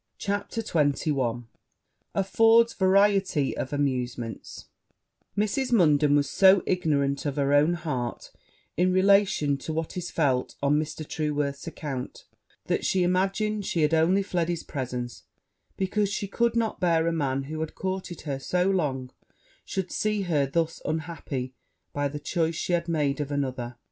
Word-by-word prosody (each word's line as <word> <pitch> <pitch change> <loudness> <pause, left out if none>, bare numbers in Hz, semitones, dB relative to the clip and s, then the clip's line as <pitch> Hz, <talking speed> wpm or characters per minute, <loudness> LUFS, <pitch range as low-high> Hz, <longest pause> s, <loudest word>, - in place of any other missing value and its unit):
CHAPTER 205 +3 -3
XXI 140 - 0 0.7
Affords 225 +4 +4
variety 190 -6 +3
of 130 - -4
amusement 125 -5 -3 0.7
Mrs. 250 +5 0
Munden 150 -9 +4
was 145 -1 +2
so 190 -1 +5
ignorant 140 -6 0
of 140 - -2
her 140 -1 +1
own 150 +4 +4
heart, 140 -8 -4 0.4
in 180 +1 +2
relation 190 -6 +3
to 160 - -5
what 160 0 -3
it 180 -1 -4
felt 140 -7 0
on 145 +2 +3
Mr. 155 0 -5
Trueworth's 145 -1 -2
account, 140 -6 -6 0.4
that - - -1
she 185 -1 +2
imagined 195 +3 0
she 165 - +1
had 150 +2 +2
only 175 +5 +3
fled 175 -3 -1
his 170 -2 -2
presence 125 -3 -5 0.5
because 200 +1 0
she 200 - -2
could 235 +4 0
not 230 -2 0
bear 165 -3 +2
a 170 - +2
man 135 -4 -1
who 155 +3 -6
had 160 0 -4
courted 185 -2 -4
her 140 -3 -4
so 180 +6 0
long 135 -8 -1 0.5
should 190 -2 -3
see 210 -1 0
her 150 -6 +1
thus 165 +3 -1
unhappy 155 -5 -4 0.4
by 145 0 0
the 150 +1 -6
choice 165 +2 -1
she 175 - -2
had 170 0 0
made 150 -3 0
of 145 - -4
another. 130 -4 -3
160 Hz, 150 wpm, -26 LUFS, 140-190 Hz, 0.7 s, so